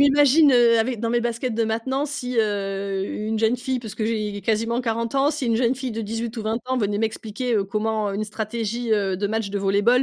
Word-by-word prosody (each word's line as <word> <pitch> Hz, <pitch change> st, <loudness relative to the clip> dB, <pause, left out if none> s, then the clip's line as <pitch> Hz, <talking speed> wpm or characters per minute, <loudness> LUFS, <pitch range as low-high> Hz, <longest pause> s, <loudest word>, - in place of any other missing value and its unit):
m'imagine, 285 Hz, +1 st, +6 dB
heu, 235 Hz, -2 st, +5 dB
avec, 230 Hz, 0 st, 0 dB
dans 230 Hz, -, -1 dB
mes 240 Hz, +1 st, +2 dB
baskets 235 Hz, 0 st, -2 dB
de 230 Hz, 0 st, +1 dB
maintenant 245 Hz, +6 st, -1 dB
si, 275 Hz, -4 st, -4 dB
heu, 195 Hz, -2 st, -1 dB
une 215 Hz, +1 st, -3 dB
jeune 225 Hz, +3 st, +2 dB
fille, 255 Hz, 0 st, -2 dB
parce 220 Hz, -4 st, -8 dB
que 220 Hz, -, -2 dB
j'ai 210 Hz, -3 st, -2 dB
quasiment 230 Hz, +3 st, 0 dB
40 230 Hz, +1 st, -2 dB
ans, 275 Hz, +2 st, +3 dB
si 285 Hz, -4 st, -3 dB
une 230 Hz, -1 st, +2 dB
jeune 245 Hz, +1 st, +2 dB
fille 255 Hz, -2 st, -4 dB
de 225 Hz, -, -3 dB
18 225 Hz, +2 st, -4 dB
ou 225 Hz, -, -3 dB
20 220 Hz, +1 st, -1 dB
ans 260 Hz, 0 st, 0 dB
venait 205 Hz, -3 st, 0 dB
m'expliquer, 225 Hz, +2 st, -2 dB
heu, 205 Hz, -2 st, +2 dB
comment, 215 Hz, +1 st, -1 dB
heu, -, -, -4 dB
une 210 Hz, +2 st, -1 dB
stratégie, 225 Hz, +2 st, -3 dB
heu, 195 Hz, -3 st, +1 dB
de 205 Hz, +2 st, -1 dB
match 220 Hz, -1 st, -1 dB
de 200 Hz, -, -2 dB
volley-ball, 200 Hz, +6 st, +3 dB
225 Hz, 240 wpm, -23 LUFS, 210-245 Hz, -, m'imagine